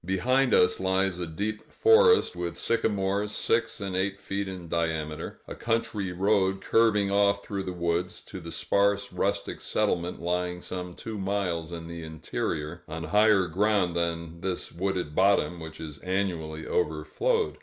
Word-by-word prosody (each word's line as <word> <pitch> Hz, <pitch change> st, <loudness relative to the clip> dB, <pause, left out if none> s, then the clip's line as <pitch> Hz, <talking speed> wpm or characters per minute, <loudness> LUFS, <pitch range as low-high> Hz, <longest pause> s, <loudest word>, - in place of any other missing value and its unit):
Behind 125 Hz, +9 st, +2 dB
us 90 Hz, -3 st, +4 dB
lies 95 Hz, -1 st, +1 dB
a 90 Hz, -, -2 dB
deep 105 Hz, +7 st, -4 dB
forest, 450 Hz, -, +5 dB
with 85 Hz, -1 st, -4 dB
sycamores 105 Hz, -2 st, 0 dB
six 115 Hz, +1 st, 0 dB
and 100 Hz, -2 st, -3 dB
eight 95 Hz, +1 st, -1 dB
feet 100 Hz, 0 st, -3 dB
in 90 Hz, -3 st, -7 dB
diameter; 80 Hz, -2 st, -2 dB
a -, -, -6 dB
country 115 Hz, -4 st, -1 dB
road 95 Hz, +1 st, +2 dB
curving 105 Hz, -2 st, +3 dB
off 100 Hz, 0 st, +3 dB
through 100 Hz, -1 st, -3 dB
the 95 Hz, -1 st, -4 dB
woods, 85 Hz, +1 st, -1 dB
to -, -, -9 dB
the -, -, -8 dB
sparse 100 Hz, 0 st, +1 dB
rustic -, -, -1 dB
settlement 90 Hz, -5 st, 0 dB
lying 90 Hz, +1 st, -1 dB
some 90 Hz, 0 st, -6 dB
two 110 Hz, -2 st, -6 dB
miles 95 Hz, -4 st, -1 dB
in 85 Hz, -1 st, -6 dB
the 85 Hz, 0 st, -7 dB
interior 80 Hz, -1 st, -4 dB
on 80 Hz, +1 st, -5 dB
higher 105 Hz, 0 st, +4 dB
ground 95 Hz, 0 st, +1 dB
than 85 Hz, -1 st, -2 dB
this 95 Hz, -1 st, -3 dB
wooded 90 Hz, -3 st, -2 dB
bottom, 95 Hz, -1 st, +3 dB
which 80 Hz, -1 st, -8 dB
is 75 Hz, -3 st, -7 dB
annually 85 Hz, -4 st, -2 dB
overflowed. 250 Hz, -, 0 dB
95 Hz, 155 wpm, -27 LUFS, 85-100 Hz, -, forest